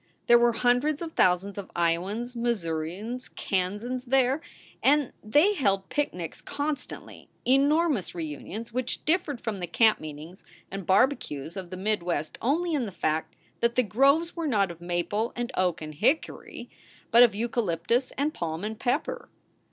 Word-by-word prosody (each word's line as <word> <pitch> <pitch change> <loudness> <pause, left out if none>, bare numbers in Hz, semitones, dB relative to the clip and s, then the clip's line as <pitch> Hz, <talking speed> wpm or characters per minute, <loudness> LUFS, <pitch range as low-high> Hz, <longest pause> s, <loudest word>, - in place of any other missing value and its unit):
There 240 0 +7
were 240 0 +4
hundreds 250 +7 +2
of 330 - -5
thousands 185 +2 +2
of 195 - -8
lowans, 190 +9 0
Missourians, 210 +1 -3
Kansans 210 +7 -2
there; 265 +3 +2 0.4
and 290 -1 +3
they 295 - +4
held 195 - 0
picnics 180 - -3
con 290 +1 -2
stantly - - -11 0.2
enormous 280 - +2
reunions 175 +8 -6
which 250 0 -2
differed 310 -5 +1
from 220 -5 -4
the 175 - -3
camp 220 +5 +4
meetings 155 +4 -9 0.3
and 195 -2 -6
barbecues 190 - +1
of 185 -3 -6
the 185 - -6
mid 210 +1 0
West 170 -3 -3
only 330 +7 +1
in 265 -6 0
the - - -6
fact 155 -3 -2 0.2
that 235 0 +1
the 255 - +4
groves 275 +9 +3
were 335 -2 -2
not 200 -8 +2
of 170 0 -12
maple 175 +6 -1
and 240 +1 -3
oak 180 -4 0
and 155 0 -7
hickory, 255 - -1 0.4
but 235 +1 +7
of 235 -4 +6
eucalyptus 230 +1 0
and 295 +3 0
palm 165 +1 -4
and 215 +1 -4
pepper. 245 - -1
225 Hz, 160 wpm, -27 LUFS, 180-260 Hz, 0.4 s, There